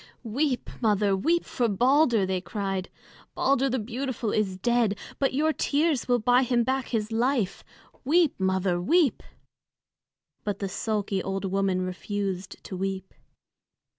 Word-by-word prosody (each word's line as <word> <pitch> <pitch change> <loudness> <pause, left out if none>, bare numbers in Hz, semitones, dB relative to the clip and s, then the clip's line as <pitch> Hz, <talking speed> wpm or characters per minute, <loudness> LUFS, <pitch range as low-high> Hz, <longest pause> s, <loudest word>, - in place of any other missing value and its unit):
"Weep, 255 +3 -1
mother, 205 -3 +2
weep 335 - +1
for 245 -2 0
Balder!" 245 0 +3
they 185 -1 -1
cried. 195 -2 -3 0.5
"Balder 270 0 +2
the 260 - 0
beautiful 240 0 -3
is 195 -3 0
dead, 230 0 +1 0.2
but 270 -2 +1
your 310 +3 +2
tears 295 -2 +1
will 245 -1 +3
buy 245 +2 +4
him 245 -2 +2
back 265 +2 -1
to 220 -3 0
life. 230 -3 0 0.4
Weep, 320 +2 +3
mother, 190 -2 +1
weep!" 315 - +3 1.2
But 205 -2 -2
the 200 - -3
sulky 205 -1 -1
old 195 +1 -3
woman 190 -1 0
refused 190 0 -4
to 190 - -7
weep. 190 0 -4
220 Hz, 135 wpm, -26 LUFS, 195-260 Hz, 1.2 s, buy